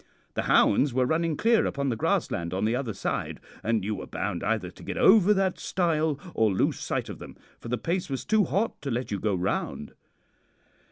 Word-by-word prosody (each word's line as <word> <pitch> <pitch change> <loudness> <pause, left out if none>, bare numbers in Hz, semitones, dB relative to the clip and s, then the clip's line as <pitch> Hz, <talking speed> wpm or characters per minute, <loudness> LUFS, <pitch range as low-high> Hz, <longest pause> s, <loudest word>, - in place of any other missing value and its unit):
The - - -1
hounds 130 +4 +4
were 130 -1 +3
running 160 +2 0
clear 230 0 +3
upon 140 0 -1
the 120 - 0
grassland 85 -5 -1
on 95 - 0
the 115 +2 +1
other 125 -3 -2
side, 100 - -3 0.2
and 110 -2 0
you 105 - -1
were - - -6
bound 85 - -3
either 105 -4 -1
to - - -16
get - - -5
over 205 -1 +6
that 195 -2 +1
stile 160 -5 0
or 110 -2 +2
lose 95 - 0
sight - - -2
of - - -8
them, - - -11 0.2
for - - -10
the 125 +1 -1
pace 175 +4 -2
was 135 -2 -4
too 215 -1 +3
hot 200 +7 -1
to 140 - -4
let 125 +1 -2
you 100 - -1
go 100 0 0
round. 90 -5 -2
130 Hz, 210 wpm, -27 LUFS, 105-170 Hz, 0.2 s, over